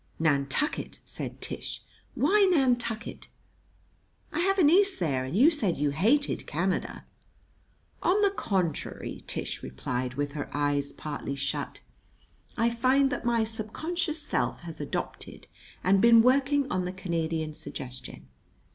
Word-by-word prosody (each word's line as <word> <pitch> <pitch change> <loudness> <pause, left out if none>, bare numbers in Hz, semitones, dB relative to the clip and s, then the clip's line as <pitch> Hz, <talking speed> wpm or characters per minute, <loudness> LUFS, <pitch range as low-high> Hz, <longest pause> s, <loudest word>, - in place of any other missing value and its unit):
] - - -35
"Nantucket!" 145 - 0
said - - -5
Tish. - - -4 0.3
"Why 405 -1 +4
Nantucket?" 245 -7 0 1.1
"I - - -1
have 390 +3 +2
a 370 - +4
niece 385 +6 +5
there, 140 -7 0
and 135 +9 -3
you 285 +9 +7
said 220 - 0
you 145 0 +1
hated 230 - +1
Canada." 180 +5 -2 1.0
"On 380 +4 +3
the 400 - +4
contrary," 190 - -2
Tish - - -3
replied, 125 - -4
with 145 +1 -2
her 145 0 -5
eyes 145 -1 +1
partly 145 -2 -5
shut, 140 0 -3 0.8
"I 230 - +3
find 260 +4 +3
that - - -3
my 235 -1 +2
subconscious 310 - -2
self 295 - -1
has 165 -3 -6
adopted 145 - -5 0.4
and 190 +2 +4
been 230 -1 +7
working 275 +2 +3
on 185 -1 0
the 180 - -4
Canadian 165 -4 -2
suggestion. 125 - -8
200 Hz, 135 wpm, -28 LUFS, -, 1.1 s, you